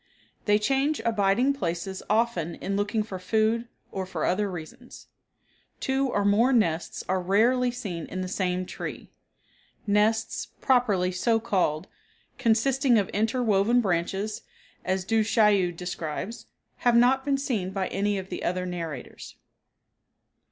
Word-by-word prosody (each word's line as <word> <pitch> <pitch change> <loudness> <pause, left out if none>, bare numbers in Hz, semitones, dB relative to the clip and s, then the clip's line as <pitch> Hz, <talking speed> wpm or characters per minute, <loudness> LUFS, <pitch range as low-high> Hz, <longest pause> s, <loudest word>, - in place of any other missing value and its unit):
They 210 -1 +4
change 270 +7 +1
abiding 225 +4 +2
places 190 -4 -3
often 210 -7 +1
in 195 - -3
looking 205 +2 0
for 195 -3 -7
food 220 +4 +1 0.2
or 190 -1 -4
for 190 - -3
other 200 +3 +1
reasons. 190 +9 -9 0.7
Two 270 +1 0
or 205 -4 0
more 220 +6 +4
nests 175 -10 0
are 185 0 0
rarely 235 +7 +3
seen 205 -9 -5
in 185 - -4
the 185 - -3
same 185 -1 -1
tree. - - -7 0.7
Nests, 215 +2 +1
properly 210 -8 +2
so 225 +5 +1
called, 185 -9 0 0.5
consisting 245 +3 +3
of 200 -3 0
inter 225 +4 0
woven 215 +2 +3
branches, 195 +1 -1 0.4
as 185 0 -1
Du 225 +1 +2
Chaillu 210 -4 +3
describes, 180 +4 -5 0.3
have 240 -1 +2
not 255 +3 +4
been 275 0 +1
seen 230 -9 -2
by 190 -1 -2
any 205 +1 0
of 190 0 -6
the - - -5
other 180 +1 -1
narrators. 165 -7 -6
205 Hz, 135 wpm, -26 LUFS, 185-235 Hz, 0.7 s, They